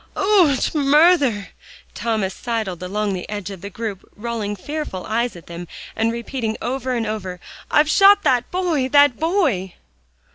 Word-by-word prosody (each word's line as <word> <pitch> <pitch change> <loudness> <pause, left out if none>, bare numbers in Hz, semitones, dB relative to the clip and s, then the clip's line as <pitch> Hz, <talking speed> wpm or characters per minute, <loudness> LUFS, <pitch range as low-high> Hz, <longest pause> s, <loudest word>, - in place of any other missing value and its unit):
"Och, 370 -9 +3
murther!" 290 - +3 0.4
Thomas 220 -5 -1
sidled 220 -8 -3
along 200 +2 -2
the 180 - -6
edge 205 -2 -5
of 190 -3 -9
the 200 - -6
group, 205 -2 -5
rolling 215 -2 -4
fearful 290 -4 -5
eyes 230 0 -1
at 170 - -12
them, 170 +1 -8 0.3
and 225 +1 +1
repeating 235 -1 -4
over 260 0 -2
and 230 -2 -1
over, 190 -4 -4 0.3
"I've 300 0 +4
shot 400 +5 +6
that 245 -2 +2
boy 335 -8 0
that 285 -3 +5
boy!" 310 - 0
235 Hz, 150 wpm, -21 LUFS, 205-290 Hz, 0.4 s, shot